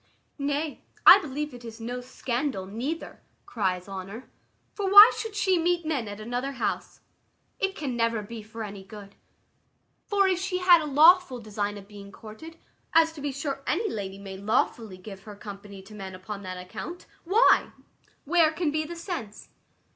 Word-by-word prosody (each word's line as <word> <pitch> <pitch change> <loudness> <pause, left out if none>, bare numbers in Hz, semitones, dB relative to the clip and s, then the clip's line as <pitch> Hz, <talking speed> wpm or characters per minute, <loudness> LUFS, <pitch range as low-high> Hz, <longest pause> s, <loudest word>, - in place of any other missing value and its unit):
"Nay, 285 +2 -2 0.2
I - - +11
believe 300 -3 -5
it 245 -1 -11
is 230 -1 -9
no 245 +2 -5
scandal, 250 -3 -3
neither," 245 +12 -5 0.2
cries 185 -4 -2
Honour, 195 +5 -8 0.4
"for 395 -2 -2
why 415 +4 +11
should 445 -2 -5
she 380 -3 +2
meet 345 0 +1
men 280 -8 -1
at 205 0 -7
another 245 +5 -3
house? 255 - -3 0.6
It 390 0 -1
can 275 -8 -4
never 230 -2 0
be 225 +2 -8
for 220 +1 -8
any 200 -2 -8
good: 200 0 -12 0.9
for 400 -1 +3
if 370 -2 +1
she 375 0 -2
had 360 -2 +6
a - - -4
lawful 310 0 +5
design 205 -2 -3
of 200 -1 -12
being 200 -1 -12
courted, 230 +12 -11 0.4
as 325 0 +5
to 300 - -10
be 285 0 -2
sure 275 0 -4
any 420 +5 0
lady 195 -2 -5
may 195 -1 -8
lawfully 210 0 -1
give 190 +1 -10
her 210 -1 -9
company 200 -1 -10
to 195 - -14
men 190 -2 -8
upon 200 +2 -7
that 185 -1 -6
account: 220 - -8 0.2
why, 410 +8 +4 0.6
where 325 0 +4
can 320 -1 -1
be 310 +1 0
the 340 +3 -7
sense?" 335 - -7
245 Hz, 175 wpm, -27 LUFS, 205-325 Hz, 0.9 s, I